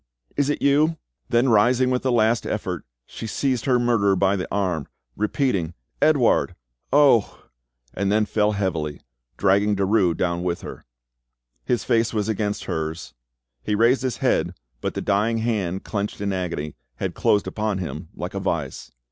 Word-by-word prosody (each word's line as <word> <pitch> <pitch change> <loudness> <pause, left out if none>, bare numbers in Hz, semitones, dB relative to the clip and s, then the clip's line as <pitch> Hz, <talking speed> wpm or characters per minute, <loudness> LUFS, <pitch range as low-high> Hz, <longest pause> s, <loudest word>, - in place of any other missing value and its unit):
—is 145 0 +1
it 145 - -1
you?" 150 +3 +3 0.3
Then 120 +3 +3
rising 125 +4 +4
with 125 - 0
a 130 - +1
last 115 -1 +2
effort, 90 -6 -3 0.2
she 115 - -7
seized 130 +1 -1
her 130 -3 +3
murderer 115 -5 +2
by 95 +1 +2
the 95 - -3
arm, 90 -7 -1 0.3
repeating, 105 - 0 0.3
"Edouard!—oh!" 120 - +2 0.5
and 100 +1 -1
then 105 +1 +3
fell 105 0 +1
heavily, 85 -7 -2 0.4
dragging 100 +1 +3
Derues 95 -3 +2
down 85 -1 0
with 90 -1 -2
her. - - -9 0.8
His 120 - 0
face 115 0 +1
was 105 -1 0
against 105 -1 -1
hers; 80 +1 -4 0.5
he 105 - -1
raised 120 +5 +4
his 130 -4 -2
head, - - +1 0.3
but - - -3
the - - -2
dying 105 +3 +1
hand, 105 -5 -1
clenched 100 -1 -3
in 100 -1 -1
agony, 85 -5 -3 0.2
had - - -3
closed 105 - +2
upon 105 -2 -2
him 80 -3 -6
like 90 +1 -5
a 100 - -2
vise. 85 -8 -3
105 Hz, 155 wpm, -23 LUFS, 90-120 Hz, 0.8 s, rising